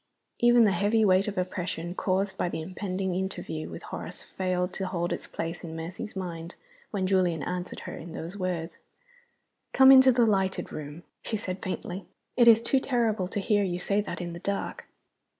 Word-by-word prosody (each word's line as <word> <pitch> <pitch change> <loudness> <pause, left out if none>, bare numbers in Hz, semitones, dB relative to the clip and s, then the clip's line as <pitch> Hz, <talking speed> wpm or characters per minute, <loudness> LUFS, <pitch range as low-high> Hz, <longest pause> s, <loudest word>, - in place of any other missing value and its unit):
Even 240 0 +6
the 210 - +5
heavy 205 +4 +2
weight 190 +1 +4
of 210 - -4
oppression 180 -2 -3
caused 190 +1 0
by 180 - -1
the - - -4
impending 185 +2 -3
interview 175 -4 -4
with - - -8
Horace - - -7
failed 185 -1 -2
to 190 - -3
hold 175 -1 -1
its - - -5
place 165 +1 -5
in 160 -1 -6
Mercy's 170 +6 -6
mind 170 -2 -5 0.3
when 195 -3 -1
Julian 185 -5 +2
answered 180 0 -4
her - - -7
in 165 +1 -9
those 170 +4 -6
words. 180 -4 -3 0.9
"Come 265 0 +8
into 260 -1 +9
the 240 -1 +4
lighted 190 -3 0
room," 150 +2 -7 0.2
she 220 - -2
said, 190 -3 -5
faintly. 185 0 -5 0.3
"It 240 -1 +5
is 230 0 +8
too 265 +3 +3
terrible 230 -8 0
to 200 - -3
hear 205 +1 +2
you 180 -2 -1
say 200 +3 +1
that 205 - -5
in 175 -1 -5
the 170 - -7
dark." 200 +2 -3
185 Hz, 185 wpm, -28 LUFS, 175-205 Hz, 0.9 s, into